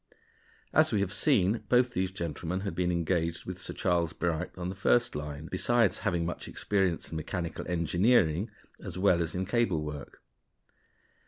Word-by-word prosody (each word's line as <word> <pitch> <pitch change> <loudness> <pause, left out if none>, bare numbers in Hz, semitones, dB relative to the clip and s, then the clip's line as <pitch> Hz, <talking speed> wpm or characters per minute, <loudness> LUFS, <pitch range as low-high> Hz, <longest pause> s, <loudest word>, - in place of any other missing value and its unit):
As - - +5
we 105 - +2
have 100 0 -1
seen, 100 +2 +2
both 125 0 +4
these 95 0 0
gentlemen 85 0 -3
had 100 -3 -3
been 90 +1 0
engaged 85 -1 -1
with 90 0 -6
Sir - - -6
Charles 85 -3 +1
Bright 85 0 -1
on 90 0 -3
the - - -3
first 120 +3 +2
line, 75 +1 -5
besides 115 +3 +2
having 85 -1 0
much 85 - -4
experience 95 -5 0
in 80 - -3
mechanical 85 +2 -4
engineering 90 +2 +2 0.3
as - - -6
well 90 -2 +3
as 85 0 -2
in 95 +1 -1
cable 100 -7 +1
work. 75 -2 -8
90 Hz, 165 wpm, -29 LUFS, 85-95 Hz, 0.3 s, As